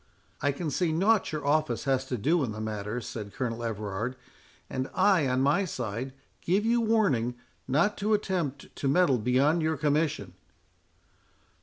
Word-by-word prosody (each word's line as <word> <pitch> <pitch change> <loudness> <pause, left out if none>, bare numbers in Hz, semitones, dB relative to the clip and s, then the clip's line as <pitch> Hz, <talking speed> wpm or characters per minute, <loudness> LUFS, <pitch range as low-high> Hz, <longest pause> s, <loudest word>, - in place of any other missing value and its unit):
"I 145 - +2
can 150 +2 -4
see 170 +3 +1
nought 195 +6 +2
your 155 -2 -4
office 155 +2 +1
has 135 -1 +1
to 130 -1 -3
do 155 +9 +2
in 115 -5 -2
the 110 - -7
matter," 110 +2 -3
said 105 -3 -7
Colonel 120 -2 -3
Everard; 110 +2 -3 0.5
"and 130 0 -3
I, 185 -9 +4
on 130 0 +1
my 145 +9 +3
side, 125 - -4 0.3
give 195 +5 +1
you 235 +1 +3
warning 195 - +2 0.3
not 160 +11 +2
to 215 +1 +2
attempt 175 -9 -3
to 140 - -1
meddle 140 -4 +3
beyond 135 +8 +2
your 160 -1 0
commission." 150 +1 0
140 Hz, 160 wpm, -28 LUFS, 125-170 Hz, 0.5 s, I